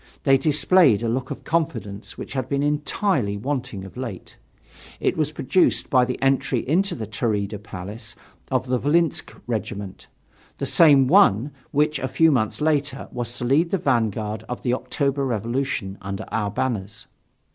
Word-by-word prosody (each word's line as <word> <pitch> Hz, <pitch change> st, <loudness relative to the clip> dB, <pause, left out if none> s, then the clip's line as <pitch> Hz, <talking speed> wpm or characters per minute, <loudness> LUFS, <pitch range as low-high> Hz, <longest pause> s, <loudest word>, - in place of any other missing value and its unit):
They 135 Hz, -1 st, +5 dB
displayed 150 Hz, -, +4 dB
a -, -, 0 dB
look 125 Hz, +3 st, -2 dB
of -, -, -6 dB
confidence 125 Hz, -11 st, -3 dB
which -, -, -7 dB
had 130 Hz, -3 st, -3 dB
been 140 Hz, 0 st, 0 dB
entirely 150 Hz, -, 0 dB
wanting 125 Hz, -4 st, -4 dB
of 95 Hz, -, -12 dB
late. 120 Hz, -8 st, -7 dB, 0.6 s
It -, -, +1 dB
was 155 Hz, -2 st, 0 dB
produced 155 Hz, +5 st, +1 dB
by 125 Hz, -2 st, +5 dB
the 125 Hz, -, -4 dB
entry 135 Hz, -2 st, +1 dB
into 180 Hz, +5 st, +1 dB
the 110 Hz, -, -5 dB
Taurida 105 Hz, -1 st, -2 dB
Palace 100 Hz, +2 st, -8 dB, 0.3 s
of -, -, 0 dB
the 125 Hz, -1 st, 0 dB
Volynsk 160 Hz, +4 st, +1 dB
regiment, 100 Hz, -4 st, -5 dB, 0.5 s
the -, -, -2 dB
same 145 Hz, -5 st, +6 dB
one, 125 Hz, +1 st, +4 dB, 0.2 s
which, 150 Hz, 0 st, +1 dB
a 130 Hz, -, -2 dB
few 160 Hz, +5 st, +4 dB
months 115 Hz, -1 st, 0 dB
later, 145 Hz, -3 st, 0 dB
was 120 Hz, 0 st, -5 dB
to 125 Hz, -, -3 dB
lead 150 Hz, +7 st, +3 dB
the 195 Hz, -, +1 dB
vanguard 110 Hz, -, -1 dB
of 125 Hz, -, -5 dB
the 125 Hz, -, +1 dB
October 140 Hz, +2 st, -1 dB
revolution, 120 Hz, -4 st, -2 dB
under 100 Hz, +2 st, -5 dB
our 105 Hz, -2 st, 0 dB
banners. 105 Hz, -2 st, -3 dB
130 Hz, 160 wpm, -23 LUFS, 110-145 Hz, 0.6 s, same